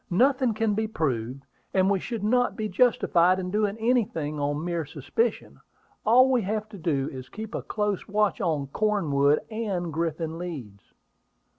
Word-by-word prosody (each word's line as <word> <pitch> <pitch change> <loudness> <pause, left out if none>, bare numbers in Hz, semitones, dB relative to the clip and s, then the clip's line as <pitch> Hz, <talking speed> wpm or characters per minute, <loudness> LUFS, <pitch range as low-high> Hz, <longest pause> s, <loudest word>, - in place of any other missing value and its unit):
"Nothing 255 +4 +3
can 220 -1 +1
be 220 +1 0
proved; 135 - -2 0.3
and 190 0 +4
we 195 -1 +2
should 230 +1 -5
not 245 +3 +2
be 215 -1 -2
justified 185 -4 +3
in 180 -1 -4
doing 210 0 0
anything 210 -11 0
on 145 +2 -1
mere 170 -2 -1
suspicion. 150 - -2 0.5
All 255 +4 +6
we 250 -2 +3
have 215 +2 -2
to 205 -3 -10
do 145 -5 0
is 130 -1 -7
to 125 - -24
keep 220 0 -7
a - - -2
close 210 -3 -2
watch 210 +2 +1
on 155 -6 0
Cornwood 150 -5 +2
and 195 -7 -3
Griffin 165 0 -2
Leeds." 130 - -8
190 Hz, 165 wpm, -26 LUFS, 155-220 Hz, 0.5 s, All